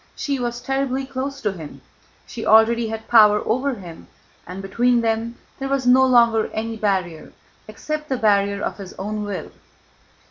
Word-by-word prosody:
She 280 -2 -2
was 240 0 -3
terribly 270 0 -1
close 275 +1 -5
to 210 - 0
him. 160 -6 -10 0.4
She 225 - -8
already 225 +1 +4
had 220 0 -6
power 210 -3 +6
over 260 +4 0
him, 175 -6 -11 0.4
and 180 +2 -7
between 235 +5 +1
them 225 +1 -1 0.2
there 270 0 -4
was 275 -2 -1
no 255 +1 +6
longer 235 -3 +4
any 225 +1 -3
barrier 190 -6 -2 0.4
except 305 +8 -5
the 260 - 0
barrier 200 -2 +1
of - - -3
his 190 -2 -9
own 210 +2 -5
will. 205 -1 -6
225 Hz, 165 wpm, -21 LUFS, 205-255 Hz, 0.4 s, power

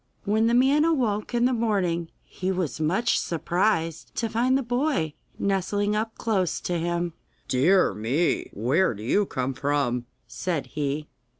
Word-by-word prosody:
When 220 +2 +2
the 235 - +3
man 270 +4 +4
awoke 240 -10 0
in 240 0 +3
the 255 - +3
morning 190 -8 0
he 185 +1 -3
was 180 -5 -2
much 180 +10 +2
surprised 170 -1 -1
to 230 - -1
find 245 +4 +2
the 275 - -1
boy 245 - 0 0.2
nestling 205 +1 0
up 220 +1 -2
close 195 -7 0
to 175 -1 -1
him. 170 0 -1 0.3
'Dear 175 +9 +3
me! 125 +11 0
where 125 - +1
do 105 - -9
you 200 - +2
come 130 +1 -2
from?' 130 -4 -1 0.2
said 170 -6 -2
he. 150 0 -2
185 Hz, 155 wpm, -25 LUFS, 155-225 Hz, 0.3 s, man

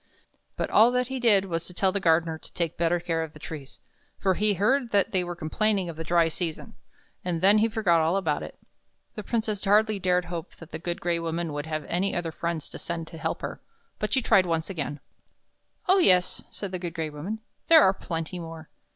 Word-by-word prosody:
But - - -3
all 225 +3 +7
that 250 0 0
he 265 0 -3
did 210 -5 +4
was 165 -3 -3
to 180 - -8
tell 190 0 +3
the 200 - -1
gardener 165 -2 +2
to - - -16
take 170 -2 -2
better 170 +1 +1
care 165 -1 -1
of 160 -1 -5
the - - -12
trees, 145 -3 -9 0.4
for 190 -1 +2
he 210 +2 +2
heard 245 +7 +2
that 200 -3 +2
they 185 -1 +2
were 175 0 -5
complaining 190 +3 0
of 165 - -6
the 165 - -5
dry 170 0 +3
season; 165 0 -4 0.5
and 175 -2 -1
then 200 +4 +5
he 220 - +4
forgot 190 -7 +2
all 165 +4 +2
about 195 - 0
it. - - -8 0.6
The 210 - -6
Princess 215 -2 -2
hardly 210 +1 +3
dared 180 -1 +1
hope 170 -2 -6
that 165 0 -13
the 160 - -5
Good 170 +1 -4
Gray 170 -1 0
Woman 165 -1 -3
would 145 +1 -4
have 155 -1 -3
any 190 +3 -1
other 170 -2 -2
friends 170 -1 -3
to - - -9
send 170 -1 -4
to 165 - -10
help - - -3
her, - - -5 0.4
but 215 - -2
she 265 -2 +1
tried 185 -5 +4
once 165 +2 -1
again. 145 -4 -4 0.9
"Oh, 380 +2 +5
yes," 180 - +4
said 200 -3 -6
the 185 - -3
Good 175 -2 -5
Gray 160 -2 -3
Woman, 165 +9 -5 0.3
"there 320 -2 +8
are 190 - +5
plenty 170 -1 -5
more." 165 -2 -9
175 Hz, 225 wpm, -26 LUFS, 165-200 Hz, 0.9 s, there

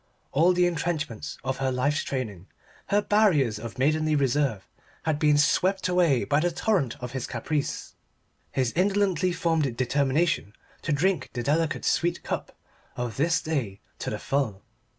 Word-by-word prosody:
All 165 +7 +4
the 180 0 +3
entrenchments 160 -8 -2
of 130 0 -2
her 135 -1 0
life's 145 +4 +1
training, 105 -9 -4 0.4
her 205 +1 +2
barriers 155 - +3
of 115 -2 -7
maidenly 155 +3 +2
reserve, 135 -6 +1 0.4
had 155 -2 0
been 150 -2 +4
swept 185 +6 +2
away 175 -8 +3
by 145 - +2
the 175 +3 +2
torrent 175 - 0
of 125 -1 -6
his 130 -1 -4
caprice, 150 -3 -3 0.6
his 130 -3 0
indolently 190 -1 +2
formed 160 -8 0
determination 140 -1 +1 0.3
to 165 - -2
drink 155 0 +1
the 120 - -3
delicate 160 +4 0
sweet 175 0 +1
cup - - -4 0.4
of 120 -2 -4
this 165 +4 +2
day 130 -11 -2 0.2
to - - -3
the - - -3
full. 120 -9 -1
150 Hz, 150 wpm, -26 LUFS, 130-170 Hz, 0.6 s, All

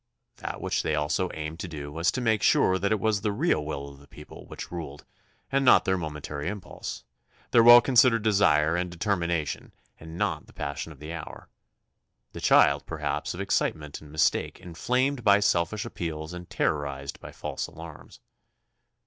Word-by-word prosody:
That - - -6
which - - 0
they 80 - -1
also 80 +5 0
aimed 80 +1 -6
to 95 - -4
do 75 -3 -7
was 80 +3 +1
to 130 - -2
make 110 -3 +1
sure 95 -2 +3
that 100 +2 0
it 110 - +2
was 105 0 +1
the 105 -1 0
real 105 - +1
will 70 -2 -5
of 70 -1 -13
the 70 - -18
people 75 +1 -13
which - - -8
ruled 80 -5 -7 0.5
and 135 0 +2
not 125 - +6
their 95 - +2
momentary 75 -3 -5
impulse, 95 -1 -6 0.5
their 115 - +6
well 120 +1 +10
considered 120 -3 +4
desire 85 -7 +3
and 90 0 -1
determination 85 -4 -2 0.3
and 80 +1 -10
not 85 -7 -2
the - - -18
passion 75 +2 -5
of 75 - -13
the 75 +4 -8
hour, 85 -3 -9 0.8
the - - -9
child, - - +4
perhaps, - - -3
of - - -5
excitement 75 -2 -1
and 75 -1 -13
mistake 75 -2 0
inflamed 125 +9 -1
by 100 -1 +6
selfish 100 +1 +1
appeals 80 -6 -5
and 90 0 -9
terrorized 70 -2 -2
by - - -10
false - - -5
alarms. 80 -2 -12
85 Hz, 175 wpm, -27 LUFS, 75-105 Hz, 0.8 s, well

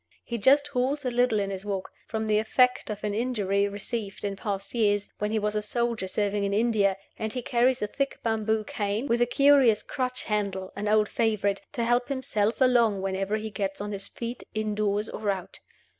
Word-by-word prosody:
He 235 -1 -4
just 285 +7 +4
halts 275 +2 -1
a 250 - 0
little 245 -2 +2
in 195 -1 -1
his 190 -1 -5
walk, 195 -2 -4 0.2
from 220 -1 -2
the 215 -1 +3
effect 250 +3 +2
of 210 -1 -5
an 210 -1 -1
injury 205 -4 +1
received 205 0 -4
in 200 -1 -2
past 195 -1 -4
years, 205 -3 +1
when 210 - 0
he 220 - 0
was 210 0 0
a 210 - +1
soldier 230 -1 -1
serving 205 +1 0
in 200 0 0
India, 210 -4 +2 0.2
and 220 0 -2
he 250 +1 -4
carries 245 +1 +2
a - - +3
thick 275 +5 -2
bamboo 220 -1 0
cane, 205 +3 -2
with 235 -3 +1
a 240 - +4
curious 270 -4 +5
crutch 255 -2 -2
handle 200 -3 -2
(an 205 +1 -3
old 215 0 +4
favorite), 205 -3 0
to 235 - -1
help 240 +2 +1
himself 235 -4 -1
along 235 -6 +4
whenever 195 +2 -1
he 220 0 -5
gets 195 -1 -3
on 205 +1 -4
his 200 0 -3
feet, 235 +1 -6
in 215 -1 -1
doors 210 0 0
or 210 -1 -3
out. 190 -3 -3
215 Hz, 205 wpm, -27 LUFS, 200-240 Hz, 0.2 s, curious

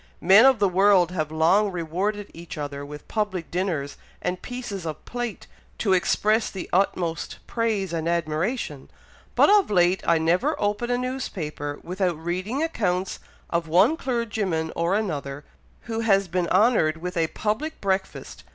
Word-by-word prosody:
Men 195 +7 +7
of 265 -2 +5
the 205 -2 +3
world 185 -1 +4
have 155 -4 -2
long 175 +7 +3
rewarded 190 +5 -3
each 170 0 -9
other 145 -1 -5
with 150 +1 -10
public 205 -6 -2
dinners 170 -6 -2 0.2
and 180 0 -3
pieces 245 -7 -6
of 155 -2 -6
plate, 240 -3 -5 0.3
to 195 -4 +1
express 210 +4 +2
the 190 - -6
utmost 175 -3 0
praise 215 -6 -1
and 165 0 -1
admiration, 165 - -2 0.5
but - - +6
of 410 -2 +5
late 180 -2 +3
I 170 - +5
never 180 - +1
open 210 +4 -1
a 245 - +1
newspaper 175 - -4
without 180 -1 -1
reading 185 - -2
accounts 190 - -1 0.3
of 170 -1 0
one 190 - +4
clergyman 210 - -2
or 170 +3 +1
another, 145 -9 -3 0.4
who 225 -1 -4
has 195 -4 +3
been 175 0 -1
'honoured 185 -6 +3
with 180 +2 -5
a 165 -1 +2
public 235 - -3
breakfast!' 190 -1 -3
185 Hz, 150 wpm, -24 LUFS, 165-215 Hz, 0.5 s, Men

